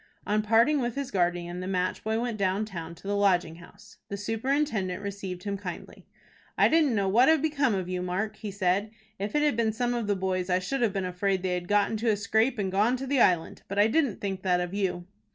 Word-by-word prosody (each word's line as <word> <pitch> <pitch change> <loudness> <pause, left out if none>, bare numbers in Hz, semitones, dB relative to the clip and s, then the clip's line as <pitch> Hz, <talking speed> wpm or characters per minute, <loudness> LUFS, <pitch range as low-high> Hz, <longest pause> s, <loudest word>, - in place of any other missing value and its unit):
On 210 +1 +1
parting 230 +7 +3
with 240 -1 -2
his 275 -1 -4
guardian 175 -1 -1
the 185 - -5
match 185 -1 -1
boy 220 +1 0
went 235 -3 -3
down 195 +2 +1
town 170 -5 -7
to 180 - -12
the 205 - 0
Lodging 180 -5 +2
House. 205 +5 -16
The 200 - -4
superintendent 225 -2 -1
received 195 -3 -5
him 200 -1 -3
kindly. 180 -3 -8 0.5
"I - - +5
didn't 310 -6 +3
know 200 -2 +1
what 235 +8 +5
had 320 -1 +5
become 280 -7 +1
of 185 -2 -3
you, 180 0 -3
Mark," 190 +4 -2
he 215 - -6
said. 195 +1 0 0.3
"If 205 +7 -3
it 295 - +3
had 295 -4 +2
been 225 -1 +1
some 245 +2 -1
of 235 -3 -2
the 205 - +2
boys, 185 -1 -2
I 180 - +3
should 190 +9 -2
have 230 -4 +2
been 195 -1 -2
afraid 185 +1 -1
they 185 -1 0
had 175 -1 -3
got 205 0 +2
into 225 +1 0
a 210 - +2
scrape, 220 +5 +1
and 195 -3 -1
gone 215 +6 +2
to 270 - -5
the 270 -1 +2
Island. 175 -3 +2
But 195 - -5
I 205 - +6
didn't 245 -1 +1
think 195 -2 -3
that 180 -2 +2
of 180 +1 -3
you." 190 -3 -2
200 Hz, 240 wpm, -27 LUFS, 185-230 Hz, 0.5 s, I